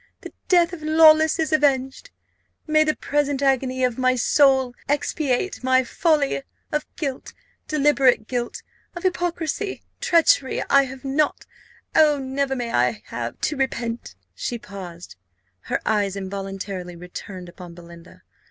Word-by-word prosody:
the - - -10
death 350 -2 +4
of 340 - -7
Lawless 315 0 +5
is 320 -1 -1
avenged. 275 - +1 0.6
May 310 0 +4
the 310 0 0
present 285 -1 -1
agony 260 -1 +1
of 250 -1 0
my 255 0 +3
soul 265 0 +3 0.2
expiate 290 +1 -1
my 260 0 +3
folly! 295 0 +1 0.3
Of 300 0 -2
guilt 275 -4 -5 0.3
deliberate 275 -6 +3
guilt 240 -2 -3 0.3
of 350 - -7
hypocrisy 355 +1 -2 0.2
treachery 325 -5 +3
I 275 0 +6
have 265 0 -10
not 285 +2 0 0.5
oh, 305 -2 +5
never 270 0 -2
may 240 -2 -4
I 120 -3 +1
have 120 -1 -5
to 305 - 0
repent!" 240 -3 -3 0.2
She 240 - -4
paused 180 - -10 0.5
her - - -1
eyes 205 -3 +1
involuntarily 195 -2 -6
returned 180 +1 -9
upon 175 -1 -11
Belinda. 170 0 -14
265 Hz, 135 wpm, -23 LUFS, 205-305 Hz, 0.6 s, I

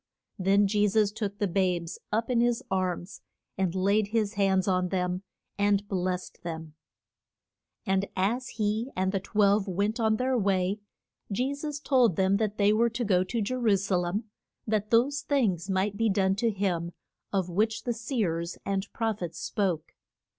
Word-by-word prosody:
Then 195 +2 +4
Je 205 +1 +2
sus 205 0 +2
took 205 -2 -4
the 205 -1 0
babes 180 -2 0
up 225 +3 0
in 235 -1 +3
his 240 -1 +1
arms, 185 0 -2 0.3
and 185 -2 -1
laid 200 +3 +2
his 215 -1 0
hands 195 -2 +2
on 185 -1 +1
them, 180 -1 -1 0.4
and 205 0 +2
blest 185 -2 -3
them. 160 -2 -6 1.1
And 195 -1 +1
as 230 +7 0
he 215 +3 0
and 190 +1 +1
the 195 - 0
twelve 205 +1 +2
went 200 +5 -1
on 220 -1 +3
their 255 +3 0
way, 195 -2 +1 0.5
Je 255 +7 0
sus 290 0 -5
told 255 - +3
them 190 +2 +3
that 215 -1 -1
they 205 0 +4
were 235 +2 +3
to 230 +1 -3
go 185 -3 +3
to 225 +5 -2
Je 210 - -2
ru 230 -6 +3
sa 195 0 -1
lem 175 +5 -1 0.4
that 215 -1 0
those 260 +4 +3
things 210 - 0
might 195 +2 0
be 225 0 +2
done 195 -1 +2
to 230 +2 +2
him 180 -5 -1 0.4
of 190 -3 -1
which 215 +5 0
the 240 - -1
seers 205 - -2
and 195 +1 -2
proph 225 -3 -1
ets 170 -2 -4
spoke. 180 -7 -2
200 Hz, 175 wpm, -28 LUFS, 185-225 Hz, 1.1 s, Then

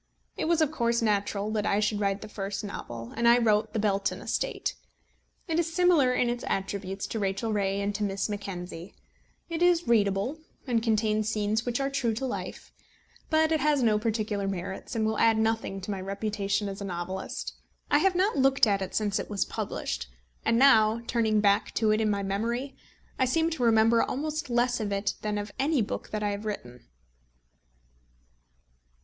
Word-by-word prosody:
It - - -2
was 330 0 +2
of 305 - 0
course 235 -5 +1
natural 205 -1 0
that 215 -1 0
I 200 - +2
should 210 0 0
write 200 -1 0
the 215 - -7
first 200 -1 -4
novel, 120 - -7
and 235 - +2
I 235 +1 +7
wrote 215 -3 +2
The - - -1
Belton 200 -1 0
Estate. - - -2 0.7
It 330 -1 +1
is 335 -1 0
similar 335 -7 +4
in 250 -1 +2
its 240 0 -2
attributes 195 0 -3
to 225 - -4
Rachel 200 +3 -1
Ray 195 -1 0
and 200 +1 -1
to 210 +1 -2
Miss 195 -1 -1
Mackenzie. 190 -4 -6 0.5
It 335 0 -4
is 350 -1 +3
readable, 210 +5 +2 0.3
and 240 -4 +1
contains 215 -1 +1
scenes 215 +1 -1
which 245 +1 0
are 275 0 -1
true 240 -5 0
to 265 - -3
life; 260 - -5 0.6
but 315 0 +3
it 315 - +3
has 290 -2 +2
no 215 -2 +3
peculiar 215 -3 -1
merits, 190 +3 -5
and 220 -1 +1
will 220 0 0
add 225 -1 +4
nothing 220 -3 0
to 190 - -5
my 195 -2 -3
reputation 200 +1 -2
as 195 0 -6
a - - -3
novelist. 185 +1 -4 0.4
I - - +5
have 385 -1 +2
not 380 +3 +2
looked 270 -1 +4
at 200 -2 +1
it 190 - -4
since 210 -1 +1
it - - -5
was 205 -2 0
published; - - -4 0.4
and 230 - +2
now 225 -4 +5
turning 220 -3 +2
back 200 -1 +2
to 220 -1 +3
it 215 +1 +2
in 215 - +2
my 200 -1 0
memory, 235 +7 -2 0.4
I 260 - +4
seem 325 +6 +1
to 320 - -4
remember 230 0 +5
almost 305 +1 -2
less 240 0 +1
of 210 -2 -2
it 200 0 0
than 210 -1 -2
of 205 0 -4
any 280 -2 +2
book - - -5
that 215 0 -3
I 205 - +1
have 205 +1 -4
written. 125 - -6
215 Hz, 190 wpm, -28 LUFS, 200-245 Hz, 0.7 s, I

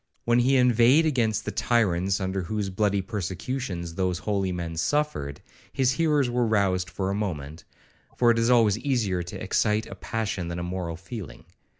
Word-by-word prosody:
When 120 +1 +3
he 130 +2 +3
inveighed 125 +5 +5
against 115 -8 +1
the - - -2
tyrants 95 -5 +1
under 95 0 -2
whose 100 +2 -3
bloody 100 0 +1
persecutions 95 -2 -4
those 90 0 -1
holy 100 -1 -1
men 85 -2 -4
suffered, 85 - -1 0.3
his 130 -1 +2
hearers 150 -2 +2
were 120 -1 +1
roused 95 -4 +1
for 95 +3 -2
a - - -1
moment, 80 -7 -4 0.5
for 120 -1 +5
it 115 - +1
is 115 +1 +2
always 115 -4 +4
easier 115 -10 0
to 90 - -7
excite 105 +1 +1
a - - -9
passion 105 -6 -3
than 85 0 -4
a 85 - -3
moral 90 -2 -4
feeling. 95 - -9
105 Hz, 175 wpm, -26 LUFS, 90-120 Hz, 0.5 s, inveighed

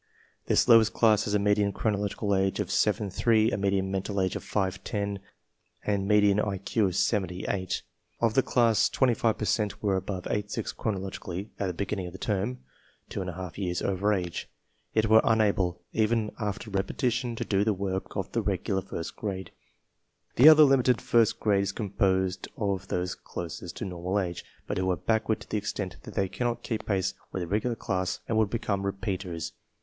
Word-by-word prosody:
This - - +3
lowest 115 -2 +6
class 110 -2 +4
has 105 - 0
a - - +6
median 105 0 +2
chronolo 105 -2 0
gical 100 0 -1
age 95 +1 +1
of 100 -2 -2
7 105 0 +1
3, 110 +3 +3
a - - 0
median 95 -1 0
mental 95 +1 -2
age 95 -1 0
of - - -4
5 95 -2 -2
10, 100 -1 -2 0.7
and 100 -2 0
me 105 0 +5
dian 100 0 +4
IQ 100 +1 0
of 90 - -3
78. 95 -2 -1 0.4
Of 115 -2 +2
this 135 - +4
class 115 -3 +3
25 120 -3 +2
per 105 - -2
cent 105 +2 -1
were 100 -2 +2
above 95 -1 -3
8 105 0 -2
6 115 -1 -3
chronologically 95 -2 -4
at 100 - 0
the 90 - -2
beginning 100 -1 -3
of 90 - -9
the - - -7
term 105 +5 -2 0.2
— - - -35
%}/2 90 -2 -5
years 90 -3 -2
over 100 +2 +1
age, 90 -4 -2 0.2
— - - -44
yet 110 0 +3
were 110 +1 +6
unable, 100 -6 +2
even 110 -1 +1
after 105 0 -3
repetition, 120 +5 -1
to - - -3
do 100 -1 +2
the 110 - +2
work 95 -1 -3
of - - -3
the - - 0
regular 95 -1 -1
first 85 -2 -6
grade. 95 -3 -4 0.8
The 140 +6 +9
other 155 -1 +9
limited 130 -4 +4
first 115 -2 +2
grade 100 -2 +2
is 100 -1 -1
composed 95 -2 0
of 100 -3 -1
those 90 -1 -1
closest 85 0 -7
to 115 - -4
normal 90 +2 -2
age, 90 -3 -3 0.2
but - - -2
who 95 0 0
are 90 - +1
backward 110 +3 0
to - - -11
the - - +1
extent 100 -2 -4
that - - -11
they 95 - +1
cannot 120 +4 -2
keep 110 -3 -4
pace 95 -2 0 0.2
with 95 - -3
a - - -5
regular 110 +6 0
class 95 -4 -2
and 115 - 0
would 110 -2 +2
become 100 -3 -1
re 100 - 0
s - - -22
peaters. 95 -5 -3
100 Hz, 195 wpm, -28 LUFS, 95-110 Hz, 0.8 s, The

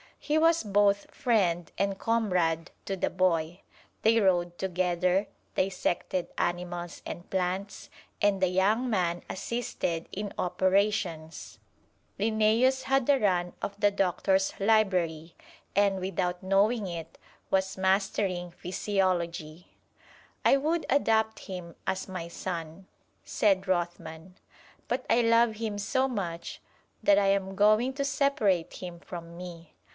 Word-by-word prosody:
He 300 +1 0
was 330 +1 +4
both 200 -1 +2
friend 180 - +1
and 200 -1 0
comrade 180 -8 0 0.2
to 195 - -2
the 190 - 0
boy. 175 -1 0 0.4
They 225 +1 +5
rode 175 -3 +2
together, 180 +1 0 0.3
dissected 185 -1 -1
animals 175 0 -3
and 175 - -7
plants, 190 +2 -2 0.3
and 200 -2 +2
the 185 - +4
young 205 +7 +2
man 175 -5 0
assisted 190 -5 -3
in 205 +1 -5
operations. 185 -3 0 0.6
Linnæus 225 +5 +3
had 270 -1 +2
the 280 0 +4
run 180 -5 +1
of 200 0 -5
the 205 -1 +4
Doctor's 190 0 +1
library, 180 -6 +1 0.4
and 200 -1 +3
without 180 -1 -2
knowing 200 +3 +2
it, 165 -2 -7 0.3
was 190 0 +1
mastering 190 -2 0
physiology. 175 -3 -2 0.8
"I - - +6
would 315 +4 0
adopt 220 -5 +2
him 180 -4 -8
as 190 - -2
my 185 -3 -5
son," 170 +1 -6 0.4
said 195 -2 +1
Rothman; 175 -1 -3 0.5
"but 255 +2 -2
I 230 +2 +4
love 230 -1 +4
him 215 -2 -3
so 260 +6 +1
much 180 -9 -4 0.4
that 300 -5 +5
I 200 - +2
am 195 -1 +1
going 215 +6 +4
to 280 +1 -2
separate 225 - +1
him 175 -2 -8
from 170 -1 -9
me. 170 -3 -9
190 Hz, 125 wpm, -28 LUFS, 175-215 Hz, 0.8 s, I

